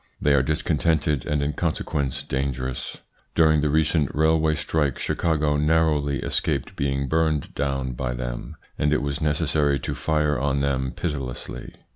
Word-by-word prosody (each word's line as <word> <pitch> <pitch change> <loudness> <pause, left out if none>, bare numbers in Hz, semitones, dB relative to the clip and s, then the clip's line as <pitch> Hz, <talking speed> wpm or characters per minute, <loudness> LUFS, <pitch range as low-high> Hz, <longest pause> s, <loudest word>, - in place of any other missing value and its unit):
They 75 - +3
are 70 - +5
discontented 75 -2 0
and 75 -1 0
in 75 +1 -1
consequence 70 -1 -2
dangerous. 65 -1 -3 0.3
During 80 -2 +5
the 75 - +1
recent 75 -1 +2
railway 80 0 +3
strike 75 -4 0
Chicago 75 -3 +1
narrowly 75 -2 +2
escaped - - -1
being 70 0 -1
burned 80 -2 0
down 70 -2 -1
by 60 0 -3
them, - - -5 0.2
and 75 - +2
it 75 - +1
was 70 +2 -2
necessary 75 -2 +1
to - - -3
fire 75 -3 0
on 70 0 0
them 65 -2 0
pitilessly. 65 -5 -5
75 Hz, 145 wpm, -24 LUFS, 70-80 Hz, 0.3 s, are